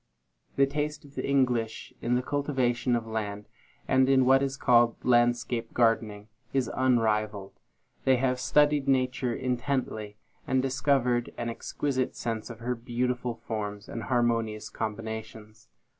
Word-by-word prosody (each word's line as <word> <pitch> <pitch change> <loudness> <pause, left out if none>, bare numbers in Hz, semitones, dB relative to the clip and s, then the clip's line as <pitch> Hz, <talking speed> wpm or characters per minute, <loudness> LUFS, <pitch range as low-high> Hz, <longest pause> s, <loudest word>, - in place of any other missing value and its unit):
The 140 - +5
taste 150 +2 -3
of 140 - -16
the - - -3
English 120 -4 0
in 120 - +1
the 125 - 0
cultivation 130 -4 0
of 115 -1 -2
land, 105 -2 -4 0.4
and 130 0 +4
in 130 -1 +5
what 135 +1 +5
is 135 -1 -1
called 120 -3 +4
landscape 120 -1 +2
gardening, 110 -3 +1 0.3
is 135 -2 0
unrivalled. 110 -5 0 0.4
They 130 - +4
have 125 0 0
studied 145 +1 +3
Nature 130 -2 +1
intently, 125 -5 -2 0.3
and 130 - +2
discovered 130 -2 +1
an 120 0 -2
exquisite 130 +2 -2
sense 115 -1 -4
of 115 -1 -9
her 125 +2 -1
beautiful 125 0 -2
forms 105 -2 -4
and 115 - -5
harmonious 115 -2 0
combinations. 110 0 -6
120 Hz, 135 wpm, -28 LUFS, 110-130 Hz, 0.4 s, The